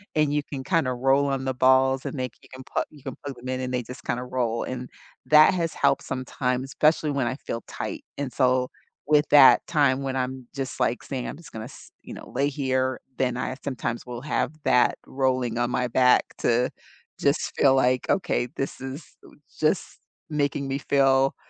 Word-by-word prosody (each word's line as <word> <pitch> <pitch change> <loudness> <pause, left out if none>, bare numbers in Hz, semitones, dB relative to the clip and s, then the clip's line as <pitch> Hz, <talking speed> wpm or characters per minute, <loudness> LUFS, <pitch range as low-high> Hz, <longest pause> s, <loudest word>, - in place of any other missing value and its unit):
and 150 -1 +2
you 150 - +1
can 135 -2 -6
kinda 160 -7 +1
roll 135 +3 +2
on 135 -1 -2
the 130 - 0
balls, 130 +1 +3
and 145 - -4
they 130 - 0 0.2
you - - -19
can 130 0 -9
put - - +1
you 145 -3 -17
can 135 -3 -6
plug 140 -2 -5
them 125 +1 -10
in, 130 0 -2
and 125 0 -3
they 125 -1 -1
just 125 +3 -10
kinda 125 +1 -2
roll, 120 -2 -1
and 125 0 -5 0.4
that 155 +4 +7
has 165 -3 -1
helped - - +2
sometimes, 130 0 -2
especially 150 +2 +2
when 135 -3 0
I 130 - -2
feel 115 -4 -5
tight, - - -5
and 140 -3 -3
so 130 -1 +2 0.4
with 150 0 +4
that 145 -3 +7
time 140 -4 +2
when 135 -1 -2
I'm 130 -1 -3
just, 135 -1 -4
like, 120 - 0
saying, 130 -3 -4
"I'm - - -5
just 170 - -14
gonna 110 0 -6
s" 135 - -13
you - - -9
know, - - -10
"lay 140 +1 +1
here," 130 -2 -1 0.2
then 125 -2 0
I 130 +1 -3
sometimes 120 -3 -3
will 120 -1 -7
have 150 +1 -1
that 125 - +3
rolling 130 -3 0
on 120 0 +1
my 125 0 0
back 125 +1 +4 0.2
to 120 +1 +2 0.5
just 140 +1 +1
feel 135 -1 +5
like, 125 -1 +2
"Okay, 180 -9 +1
this 135 - -4
is, 135 +4 -6 0.2
eh, - - -14 0.3
just 155 +3 0 0.3
making 145 -2 -1
me 135 - -1
feel 135 -1 +3
130 Hz, 205 wpm, -25 LUFS, 125-140 Hz, 0.5 s, that